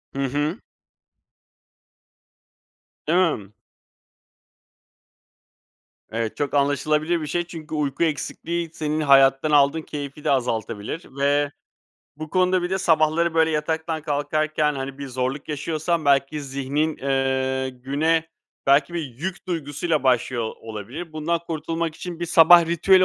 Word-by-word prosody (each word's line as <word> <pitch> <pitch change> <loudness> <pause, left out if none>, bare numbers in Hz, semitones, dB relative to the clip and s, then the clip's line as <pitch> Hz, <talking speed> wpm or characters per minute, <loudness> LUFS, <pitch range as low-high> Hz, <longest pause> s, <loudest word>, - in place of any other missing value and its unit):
Hı 140 - -1
hı. 145 - -1 2.5
Hımm. 155 - +1 2.6
Evet, 115 0 -3
çok 145 -2 -2
anlaşılabilir 150 +4 +1
bir 155 - -4
şey 175 +4 -1
çünkü 160 -2 -7
uyku 145 0 -1
eksikliği 165 +2 -2
senin 155 0 -2
hayattan 135 +1 +5
aldığın 145 +2 +4
keyfi 145 -1 -7
de 155 - +1
azaltabilir. 115 - -2
Ve 145 +1 +2 0.7
bu 155 0 -7
konuda 185 -1 +2
bir 175 - -2
de 190 - 0
sabahları, 165 -1 +2
böyle, 160 0 +4
yataktan 160 +1 -2
kalkarken, 150 +1 0
hani, 135 0 -5
bir 140 - -5
zorluk 130 +2 -3
yaşıyorsan 155 +2 -1
belki 140 +1 +2
zihnin, 140 +3 -2
ııı, 130 -1 0
güne 145 +6 0 0.4
belki 140 +4 +4
bir 170 - -1 0.2
yük 185 +5 -5
duygusuyla 155 -2 -1
başlıyor 125 -3 +1
olabilir. 115 - -7
Bundan 155 +2 -1
kurtulmak 165 0 -3
için 175 +1 -7
bir 175 - -1
sabah 170 +1 +7
ritüeli 185 +3 +4
150 Hz, 120 wpm, -23 LUFS, 135-165 Hz, 2.6 s, sabah